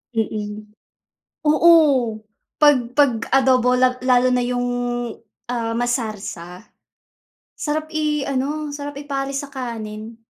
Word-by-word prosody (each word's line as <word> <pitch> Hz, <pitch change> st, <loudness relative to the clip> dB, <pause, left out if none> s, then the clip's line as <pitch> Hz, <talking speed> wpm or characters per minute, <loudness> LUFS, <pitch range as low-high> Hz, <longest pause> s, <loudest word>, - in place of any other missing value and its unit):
Mm. 210 Hz, -1 st, -4 dB, 0.7 s
Oo, 315 Hz, +3 st, +6 dB, 0.8 s
'pag 295 Hz, -2 st, +6 dB, 0.2 s
'pag 285 Hz, -3 st, +4 dB, 0.2 s
adobo 255 Hz, -2 st, +4 dB
la 255 Hz, 0 st, +2 dB
lalo 255 Hz, 0 st, +4 dB
na 250 Hz, 0 st, +2 dB
yung, 245 Hz, 0 st, -1 dB, 0.8 s
ah, 230 Hz, -2 st, -2 dB
masarsa. 215 Hz, -7 st, -3 dB, 0.9 s
Sarap 310 Hz, +1 st, -2 dB
i-ano, 300 Hz, -1 st, -1 dB
sarap 285 Hz, 0 st, -6 dB
i-pares 275 Hz, -1 st, -3 dB
sa 285 Hz, -, -8 dB
kanin. 225 Hz, -3 st, -6 dB
255 Hz, 100 wpm, -21 LUFS, 230-285 Hz, 0.9 s, Oo